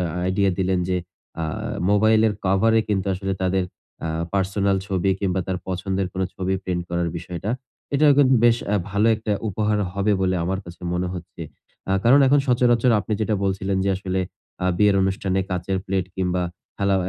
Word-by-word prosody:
আ -, -, 0 dB, 0.2 s
idea 95 Hz, +1 st, +2 dB
দিলেন 95 Hz, 0 st, +1 dB
যে 90 Hz, -, +1 dB, 0.5 s
আ -, -, 0 dB, 0.5 s
মোবাইলের 110 Hz, +1 st, +4 dB
কভারে 110 Hz, +4 st, +3 dB
কিন্তু 100 Hz, -3 st, 0 dB
আসলে 95 Hz, +1 st, -3 dB
তাদের 95 Hz, 0 st, +1 dB, 0.4 s
আ -, -, -2 dB, 0.2 s
পার্সোনাল 100 Hz, 0 st, +1 dB
ছবি 95 Hz, -1 st, 0 dB
কিংবা, 95 Hz, -1 st, 0 dB
তার 95 Hz, -1 st, -2 dB
পছন্দের 95 Hz, +1 st, -1 dB
কোন 95 Hz, -, -2 dB
ছবি 95 Hz, 0 st, -1 dB
প্রিন্ট 90 Hz, -1 st, -1 dB
করার 85 Hz, 0 st, 0 dB
বিষয়টা। 90 Hz, +4 st, -5 dB, 0.4 s
এটাও 145 Hz, 0 st, +6 dB
কিন্তু 135 Hz, -2 st, +5 dB
বেশ 115 Hz, -1 st, +6 dB, 0.2 s
আ -, -, +3 dB, 0.2 s
ভালো 100 Hz, +3 st, +2 dB
একটা 110 Hz, -1 st, -2 dB, 0.2 s
উপহার 105 Hz, +1 st, 0 dB
হবে 100 Hz, +2 st, +1 dB
বলে 95 Hz, 0 st, +1 dB
আমার 95 Hz, +2 st, -1 dB
কাছে 85 Hz, +1 st, -12 dB
মনে 90 Hz, 0 st, -1 dB
হচ্ছে। 85 Hz, -1 st, -8 dB, 0.5 s
আ -, -, +3 dB
কারণ 135 Hz, +5 st, +6 dB
এখন 140 Hz, +2 st, +5 dB
সচরাচর 120 Hz, -1 st, +3 dB
আপনি 110 Hz, -, -5 dB
যেটা 105 Hz, 0 st, +1 dB
বলছিলেন 95 Hz, 0 st, -1 dB
যে 100 Hz, -, +2 dB
আসলে 95 Hz, -1 st, -2 dB, 0.4 s
আ -, -, +2 dB
বিয়ের 105 Hz, -1 st, +4 dB
অনুষ্ঠানে 95 Hz, 0 st, 0 dB
কাঁচের 90 Hz, +1 st, -1 dB
প্লেট 95 Hz, -2 st, -1 dB
কিংবা, 90 Hz, -1 st, 0 dB, 0.3 s
খেলা 100 Hz, -1 st, +1 dB
95 Hz, 175 wpm, -23 LUFS, 95-105 Hz, 0.5 s, এটাও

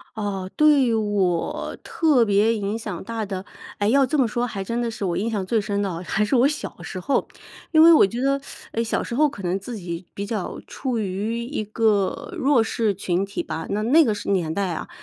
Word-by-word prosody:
呃， 195 Hz, -3 st, -3 dB
对 285 Hz, -6 st, +4 dB
我 200 Hz, -5 st, -1 dB
特 295 Hz, -8 st, +3 dB
别 210 Hz, +2 st, +3 dB
影 205 Hz, +1 st, -2 dB
响 200 Hz, -6 st, -6 dB
大 225 Hz, +1 st, -4 dB
的， 190 Hz, -1 st, -5 dB, 0.3 s
哎， 205 Hz, -, 0 dB
要 270 Hz, +3 st, +4 dB
这 295 Hz, +4 st, -1 dB
么 255 Hz, -4 st, +3 dB
说 240 Hz, +2 st, -1 dB
还 200 Hz, -5 st, -4 dB
真 235 Hz, +4 st, -2 dB
的 235 Hz, -, -1 dB
是 210 Hz, -3 st, -4 dB
我 175 Hz, -, -1 dB
印 220 Hz, +4 st, -1 dB
象 200 Hz, -4 st, -2 dB
最 220 Hz, +2 st, +1 dB
深 200 Hz, 0 st, -2 dB
的， 180 Hz, -3 st, -3 dB
还 210 Hz, +4 st, 0 dB
是 260 Hz, -, +1 dB
我 250 Hz, +3 st, +5 dB
小 300 Hz, 0 st, -5 dB
时 185 Hz, -, -6 dB
候。 230 Hz, +10 st, 0 dB, 0.4 s
因 315 Hz, -1 st, +6 dB
为 335 Hz, 0 st, +9 dB
我 300 Hz, -, +7 dB
觉 235 Hz, +4 st, -5 dB
得， 275 Hz, +1 st, +2 dB, 0.3 s
诶， 230 Hz, -, -1 dB
小 225 Hz, -, -1 dB
时 -, -, -6 dB
候 300 Hz, +1 st, +4 dB
可 200 Hz, -8 st, -10 dB
能 180 Hz, +2 st, 0 dB
自 235 Hz, +5 st, -7 dB
己 175 Hz, -1 st, -6 dB
比 200 Hz, -, -4 dB
较 205 Hz, -3 st, -4 dB
处 255 Hz, -4 st, -3 dB
于 215 Hz, +4 st, -2 dB
一 250 Hz, -4 st, -3 dB
个 210 Hz, -2 st, 0 dB
弱 265 Hz, -4 st, +3 dB
势 225 Hz, -2 st, 0 dB
群 180 Hz, +2 st, -1 dB
体 200 Hz, -, -4 dB
吧， 160 Hz, +1 st, -5 dB
那 210 Hz, +1 st, -1 dB
那 300 Hz, +8 st, +6 dB
个 225 Hz, -7 st, +1 dB, 0.2 s
年 170 Hz, -5 st, +1 dB
代 195 Hz, +1 st, -1 dB
啊 -, -, -5 dB
215 Hz, 240 characters per minute, -23 LUFS, 195-240 Hz, 0.4 s, 为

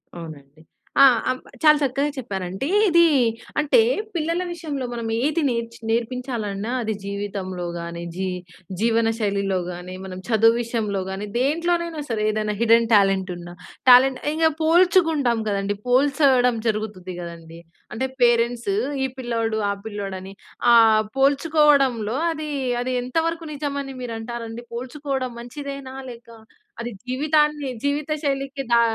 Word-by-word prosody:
అవునండి. 155 Hz, -3 st, -11 dB, 0.4 s
ఆ! -, -, +10 dB, 0.6 s
చాలా 305 Hz, -1 st, +7 dB
చక్కగా 280 Hz, +1 st, 0 dB
చెప్పారండి. 195 Hz, -1 st, -4 dB, 0.2 s
ఇది 340 Hz, 0 st, +5 dB, 0.6 s
అంటే, 300 Hz, -, +4 dB, 0.3 s
పిల్లల 335 Hz, +1 st, 0 dB
విషయంలో 300 Hz, -6 st, -4 dB
మనం 235 Hz, -1 st, -4 dB, 0.2 s
ఏది 310 Hz, +3 st, +1 dB
నేర్ 235 Hz, -1 st, -1 dB, 0.2 s
నేర్పించాలన్నా 230 Hz, -3 st, -2 dB
అది 220 Hz, 0 st, -1 dB
జీవితంలో 200 Hz, -2 st, -4 dB
గానీ, 170 Hz, 0 st, -6 dB
జీ 190 Hz, +1 st, -2 dB, 0.5 s
జీవనశైలిలో 220 Hz, -4 st, +1 dB
గానీ, 180 Hz, +1 st, -8 dB
మనం 185 Hz, -1 st, -7 dB
చదువు 225 Hz, 0 st, +5 dB
విషయంలో 220 Hz, -4 st, -2 dB
గానీ, 190 Hz, +2 st, -4 dB
దేంట్లోనైనా 335 Hz, +4 st, 0 dB
సరే 220 Hz, -2 st, -1 dB
ఏదైనా 215 Hz, -1 st, -2 dB
హిడెన్ 230 Hz, 0 st, +4 dB
టాలెంట్ 195 Hz, -2 st, +3 dB
ఉన్న, 175 Hz, 0 st, -9 dB, 0.4 s
టాలెంట్ 255 Hz, +1 st, +7 dB
ఇక 320 Hz, 0 st, +3 dB
పోల్చుకుంటాం 325 Hz, -7 st, +3 dB
గదండీ. 200 Hz, 0 st, -1 dB
పోల్చడం 255 Hz, -2 st, +3 dB
జరుగుతది 210 Hz, -4 st, -3 dB
గదండీ. 170 Hz, -1 st, -9 dB, 0.4 s
అంటే 260 Hz, +4 st, -1 dB
పేరెంట్సు 240 Hz, +8 st, +2 dB, 0.3 s
ఈ -, -, +1 dB
పిల్లోడు, 230 Hz, -3 st, -1 dB
ఆ -, -, 0 dB
పిల్లోడుని 195 Hz, -2 st, -6 dB, 0.4 s
ఆ -, -, +8 dB, 0.4 s
పోల్చుకోవడంలో 275 Hz, -5 st, +3 dB
అది, 310 Hz, -1 st, -5 dB, 0.3 s
అది 255 Hz, +1 st, -2 dB
ఎంతవరకు 325 Hz, +6 st, -1 dB
నిజమని 280 Hz, -2 st, -4 dB
మీరు 240 Hz, -2 st, -4 dB
అంటారండి? 230 Hz, 0 st, -6 dB
పోల్చుకోవడం 260 Hz, +1 st, -4 dB
మంచిదేనా? 275 Hz, +1 st, -7 dB, 0.2 s
లేక 235 Hz, 0 st, -13 dB, 0.5 s
అది 240 Hz, +1 st, -4 dB
జీవితాన్ని 300 Hz, +2 st, +1 dB
జీవిత 290 Hz, +2 st, -1 dB
శైలికి 275 Hz, 0 st, -2 dB
దా 235 Hz, -, +6 dB
240 Hz, 120 wpm, -23 LUFS, 205-285 Hz, 0.6 s, ఆ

